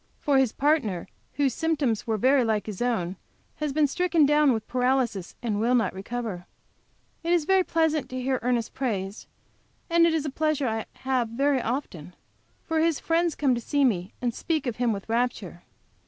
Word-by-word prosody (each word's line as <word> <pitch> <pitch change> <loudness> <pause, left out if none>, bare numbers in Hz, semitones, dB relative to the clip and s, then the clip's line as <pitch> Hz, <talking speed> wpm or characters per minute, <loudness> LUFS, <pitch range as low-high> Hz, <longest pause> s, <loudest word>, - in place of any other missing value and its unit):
For 280 -2 +3
his 260 -4 +2
partner, 265 - 0 0.3
whose 280 -4 +1
symptoms 285 -10 0
were 220 -1 0
very 260 +4 +4
like 215 -3 0
his 210 -2 -6
own, 195 -7 -1 0.4
has 300 -1 -2
been 300 +2 +3
stricken 330 +1 +2
down 295 -1 +4
with 220 -3 -2
paralysis, 250 -6 0
and 215 -3 -1
will 240 +3 +2
not 235 - +1
recover. 195 -2 -5 0.8
It 335 - -1
is 345 -3 +3
very 380 +1 +4
pleasant 320 -4 0
to 255 - -4
hear 260 0 0
Ernest 240 -1 -1
praised, 205 -6 -3 0.6
and 335 0 +5
it 330 - +1
is 310 -2 -1
a 295 - -2
pleasure 305 -2 0
I 220 -1 -2
have 255 -3 0
very 270 +3 +1
often, 185 - -4 0.5
for 325 0 -1
his 325 -2 +2
friends 335 -1 +1
come 275 -3 +2
to 240 - -2
see 285 +3 +1
me, 190 -6 0
and 240 -1 0
speak 315 +2 -2
of 240 -3 -3
him 245 -1 +1
with 200 -2 -5
rapture. 225 -7 -2
255 Hz, 185 wpm, -26 LUFS, 225-295 Hz, 0.8 s, and